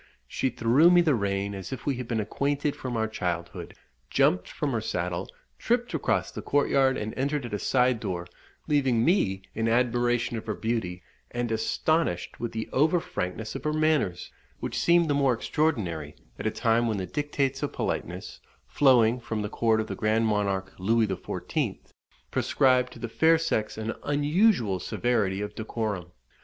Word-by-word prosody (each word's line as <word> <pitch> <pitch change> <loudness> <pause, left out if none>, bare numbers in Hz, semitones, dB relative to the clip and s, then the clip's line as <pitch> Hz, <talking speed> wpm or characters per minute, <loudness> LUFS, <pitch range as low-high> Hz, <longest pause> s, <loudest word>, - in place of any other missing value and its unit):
She 130 - -1
threw 120 +7 +4
me 175 0 +6
the 160 -4 +3
rein 100 -2 -1
as 95 +3 -7
if 130 -2 -6
we 140 -3 0
had 125 -2 -5
been 115 -2 -1
acquainted 140 +7 -1
from 125 -3 -4
our 110 0 +1
childhood, 85 -5 -4 0.3
jumped 90 0 +2
from 145 -2 -2
her 115 -3 -1
saddle, 90 -2 -3 0.3
tripped 240 +1 0
across - - 0
the - - -6
courtyard, 135 -2 +2
and 110 +1 -4
entered 140 0 -1
at 115 - -7
a 105 - -1
side 125 0 +2
door, 90 -5 -3 0.4
leaving 130 -6 +2
me 100 - +2
in 115 0 -1
admiration 120 0 +1
of 110 - -7
her 105 - -1
beauty, 95 -7 -2 0.3
and 120 -1 -3
astonished 115 - 0
with 120 - -3
the 110 0 -4
over 155 +6 +3
frankness 105 - -4
of - - -6
her 150 -1 0
manners, 155 - +1 0.3
which - - -3
seemed 170 -1 +4
the 145 - +2
more 140 -3 +3
extraordinary 105 - -1 0.2
at - - -2
a - - +3
time 115 +1 +1
when 110 -2 0
the 95 - -2
dictates 140 0 -1
of 145 - -2
politeness, - - -4 0.3
flowing 125 -4 +4
from 110 -2 -3
the 105 - -3
court 110 0 +2
of 110 - -1
the - - -5
Grand 110 +1 +1
Monarque 100 -3 0
Louis 110 +4 +3
XIV., 95 -3 -3 0.5
prescribed 125 -1 +2
to - - -12
the 120 - -4
fair 160 +8 +4
sex 135 -12 -1
an 110 0 -3
unusual 145 - +2
severity 100 0 0
of 105 0 -4
decorum. 110 -5 -3
115 Hz, 175 wpm, -27 LUFS, 105-140 Hz, 0.5 s, me